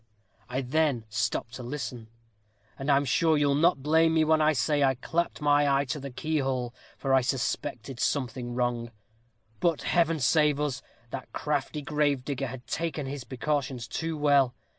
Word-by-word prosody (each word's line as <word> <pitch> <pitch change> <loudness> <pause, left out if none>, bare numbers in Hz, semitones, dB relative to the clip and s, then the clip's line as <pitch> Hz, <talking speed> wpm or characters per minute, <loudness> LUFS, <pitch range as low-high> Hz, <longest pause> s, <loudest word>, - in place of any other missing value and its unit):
I 130 +2 -1
then 135 -3 +1
stopped 115 +1 -2
to - - -7
listen: 125 -3 -5 0.7
and 135 +2 -3
I'm 140 0 +4
sure 160 +4 +3
you'll 145 -1 +3
not 150 -1 +3
blame 160 +2 +4
me 160 - +4
when 155 0 +3
I 155 0 +5
say 145 +2 +1
I 135 -1 +3
clapped 165 +6 -2
my 145 0 +4
eye 140 +1 +2
to 150 - -6
the 140 0 -6
keyhole; 130 -3 -2 0.2
for 135 -1 0
I 135 - +6
suspected 125 0 -2
something 125 -3 -1
wrong. 120 -1 -1 0.7
But, 170 -3 +1
Heaven 165 -2 +2
save 150 +1 +3
us! 145 -4 -1 0.3
that 130 - -6
crafty 150 0 -2
gravedigger 140 -2 0
had 125 0 -8
taken 160 -3 -3
his 135 -1 -5
precautions 130 -2 -2
too 165 -1 -3
well. 140 -4 +3
140 Hz, 160 wpm, -28 LUFS, 130-150 Hz, 0.7 s, I